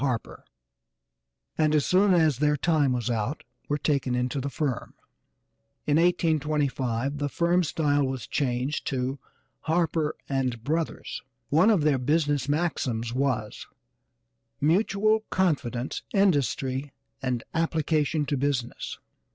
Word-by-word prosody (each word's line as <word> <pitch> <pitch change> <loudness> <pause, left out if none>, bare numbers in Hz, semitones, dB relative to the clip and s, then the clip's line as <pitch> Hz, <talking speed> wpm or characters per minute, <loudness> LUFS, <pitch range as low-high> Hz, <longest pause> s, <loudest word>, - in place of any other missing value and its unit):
Harper 125 -5 -2 1.2
and, 155 -1 +3
as 150 - +2
soon 195 +2 +4
as 155 -6 +3
their 150 0 +2
time 150 -3 +2
was 120 -1 -1
out, 115 +5 -2 0.3
were 145 - +1
taken 140 -4 0
into 125 +2 -1
the 140 - -3
firm. 140 -3 -3 0.9
In 145 0 +3
1825 145 -6 +1
the 145 0 -1
firm 175 +4 +2
style 145 -2 +1
was 130 -2 -4
changed 130 0 -1
to 130 +1 -2 0.5
Harper 160 -1 +1 0.2
& 125 -3 -2
Brothers. 160 +4 -2 0.3
One 165 +9 +5
of 200 -9 +3
their 145 -3 +3
business 145 0 +1
maxims 130 -7 -1
was, 125 -5 -2 0.9
"Mutual 200 +7 +3
confidence, 140 -9 -1
industry 140 -7 +1 0.3
and 125 -3 -1
application 160 -2 +1
to 145 0 -1
business." 130 -3 -2
145 Hz, 120 wpm, -26 LUFS, 130-160 Hz, 1.2 s, One